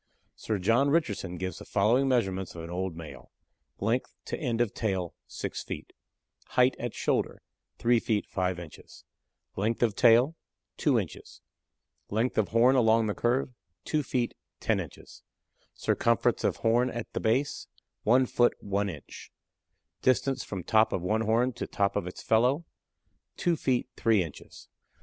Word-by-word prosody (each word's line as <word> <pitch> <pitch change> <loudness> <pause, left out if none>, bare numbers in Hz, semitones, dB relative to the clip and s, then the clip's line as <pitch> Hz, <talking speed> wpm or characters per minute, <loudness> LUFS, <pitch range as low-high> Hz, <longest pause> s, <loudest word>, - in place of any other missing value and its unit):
Sir 110 - -2
John 115 +9 +3
Richardson 105 - 0
gives 95 -1 -4
the - - -9
following 115 +7 +3
measurements 95 -9 0
of 85 - -7
an 85 - -7
old 90 -1 -3
male: 75 -6 -10 0.5
Length 115 +5 -1
to - - -3
end 120 -7 -1
of 120 -4 +1
tail, 95 -6 -2
6 - - -5
feet; - - -7 0.6
height 125 +1 +5
at 120 -1 -4
shoulder, - - -1 0.3
3 120 0 +3
feet 110 -2 0
5 90 -1 -1
inches; 85 -3 -12 0.5
length 110 +5 0
of 115 -3 +3
tail, 120 +8 +5 0.4
2 - - +3
inches; - - -5 0.7
length 110 +3 0
of 105 - +2
horn 120 +4 +4
along 115 -2 +4
the 105 - 0
curve, 125 +3 0 0.3
2 155 - +1
feet 125 -3 -1 0.3
10 - - +1
inches; - - -9 0.5
circumference - - +1
of - - +2
horn 120 +3 +2
at 120 -2 -6
the - - -1
base, 130 +6 0 0.3
1 125 +4 +4
foot 120 0 +2
1 100 0 -1
inch; 80 -6 -10 0.7
distance 130 0 +2
from 95 -3 -5
top 110 +4 +3
of 90 - -2
one 110 +4 +1
horn 115 +3 +2
to - - -5
top 100 -1 0
of 100 -3 -1
its 90 - -8
fellow, 125 +8 +2 0.7
2 175 -1 +2
feet 130 -5 0
3 110 -5 +3
inches. 80 -4 -11
115 Hz, 155 wpm, -28 LUFS, 95-125 Hz, 0.7 s, height